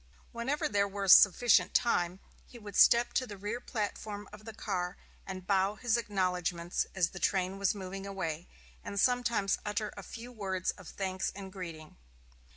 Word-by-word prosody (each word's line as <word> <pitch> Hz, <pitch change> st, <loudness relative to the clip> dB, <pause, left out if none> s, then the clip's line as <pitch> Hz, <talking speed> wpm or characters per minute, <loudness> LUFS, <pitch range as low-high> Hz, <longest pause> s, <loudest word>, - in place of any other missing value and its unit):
Whenever 250 Hz, +5 st, -1 dB
there 200 Hz, -1 st, +1 dB
was 195 Hz, -1 st, +5 dB
sufficient 215 Hz, +4 st, +6 dB
time, 180 Hz, -6 st, +2 dB, 0.3 s
he 245 Hz, -, -13 dB
would 205 Hz, -4 st, -10 dB
step 235 Hz, +1 st, +6 dB
to 255 Hz, -, 0 dB
the 205 Hz, -, -8 dB
rear 210 Hz, +5 st, -4 dB
platform 210 Hz, -3 st, -4 dB
of 210 Hz, 0 st, -12 dB
the 225 Hz, -, -7 dB
car 180 Hz, -5 st, -3 dB, 0.3 s
and 185 Hz, -1 st, -6 dB
bow 195 Hz, +1 st, +2 dB
his 240 Hz, 0 st, +1 dB
acknowledgments 180 Hz, -5 st, -1 dB
as 180 Hz, -3 st, +2 dB
the 185 Hz, -, -8 dB
train 190 Hz, +1 st, 0 dB
was 200 Hz, +1 st, +1 dB
moving 195 Hz, 0 st, -6 dB
away, 175 Hz, -4 st, -4 dB, 0.4 s
and 200 Hz, -, -4 dB
sometimes 235 Hz, -4 st, +2 dB
utter 210 Hz, 0 st, -2 dB
a 200 Hz, -, -7 dB
few 230 Hz, +5 st, -9 dB
words 190 Hz, -5 st, -2 dB
of 185 Hz, -4 st, -14 dB
thanks 190 Hz, -1 st, -3 dB
and 195 Hz, -1 st, -8 dB
greeting. 165 Hz, -5 st, -8 dB
200 Hz, 165 wpm, -31 LUFS, 185-215 Hz, 0.4 s, sufficient